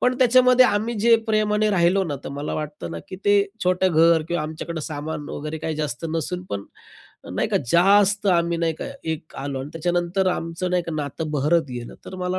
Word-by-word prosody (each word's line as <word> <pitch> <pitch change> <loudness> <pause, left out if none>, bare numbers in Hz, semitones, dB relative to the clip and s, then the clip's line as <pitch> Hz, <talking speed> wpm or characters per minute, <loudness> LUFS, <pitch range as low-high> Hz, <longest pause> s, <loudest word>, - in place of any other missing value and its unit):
पण 250 0 +2
त्याच्यामध्ये 255 0 +6
आम्ही 220 +2 0
जे 230 +2 +6
प्रेमाने 215 0 +2
राहिलो 185 +1 +3
ना, 145 -4 -3
तर - - -4
मला 145 +2 -4
वाटतं 150 - -5
ना 85 - -5
की 185 - -7
ते 205 0 +5 0.2
छोटं 185 0 +2
घर 165 0 +5
किंवा 170 -3 -1
आमच्याकडं 160 +1 -5
सामान 150 0 -5
वगैरे 155 +2 -5
काही 155 0 -3
जास्त 150 -2 -3
नसून 165 +3 -3
पण 100 0 -3 0.7
नाही - - 0
का, - - +1 0.2
जास्त 200 +3 +4
आम्ही 170 -2 +2
नाही 165 -1 +1
का - - -5 0.2
एक 160 0 -6
आलो 135 -1 -4
आणि 135 - -6
त्याच्यानंतर 175 +3 0
आमचं 165 +2 -3
नाही 180 -1 +1
का 165 - -5
नातं 150 +2 -4
बहरत 150 +4 +2
गेलं. 120 -1 -7
तर 185 - -8
मला 185 0 -2
170 Hz, 200 wpm, -23 LUFS, 155-195 Hz, 0.7 s, त्याच्यामध्ये